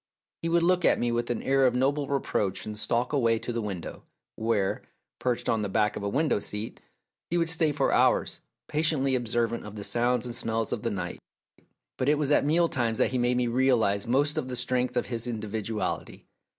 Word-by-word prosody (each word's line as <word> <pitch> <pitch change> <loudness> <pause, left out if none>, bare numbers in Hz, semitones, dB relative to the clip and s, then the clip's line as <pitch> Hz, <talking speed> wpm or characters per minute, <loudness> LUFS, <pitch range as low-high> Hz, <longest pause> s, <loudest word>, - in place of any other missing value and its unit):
He 165 - -1
would 170 0 +3
look 180 0 +3
at - - +4
me 120 0 0
with 120 0 -1
an 120 - -2
air 135 0 +3
of 125 - 0
noble 140 +3 +1
reproach 105 -8 -1
and 105 - -5
stalk 120 +5 0
away 115 -5 +3
to 120 - -5
the 115 - -1
window, 95 -5 -6 0.3
where, 110 -3 0 0.4
perched 125 -2 -1
on 110 - +1
the 100 - -2
back 105 +1 +1
of - - -5
a 100 - -2
window 145 +2 +1
seat, 105 +2 -6 0.5
he 175 - 0
would 165 -1 +2
stay 160 -1 +2
for - - +1
hours, - - +2 0.3
patiently 150 -3 +1
observant 120 -1 0
of 105 0 -9
the 105 - -6
sounds 120 +3 +1
and 120 - -4
smells 115 -2 -1
of 110 - -3
the 115 - -1
night. 90 -4 -4 0.8
But 130 - +1
it 150 - +4
was 150 -1 0
at - - +4
mealtimes 145 -8 +1
that - - +2
he 130 - 0
made 120 0 +2
me 125 - +2
realise 120 -5 +2
most 140 +5 +2
the 125 - -4
strength 125 0 -1
of - - +1
his 115 -1 -3
individuality. 110 -1 -4
120 Hz, 205 wpm, -27 LUFS, 110-135 Hz, 0.8 s, at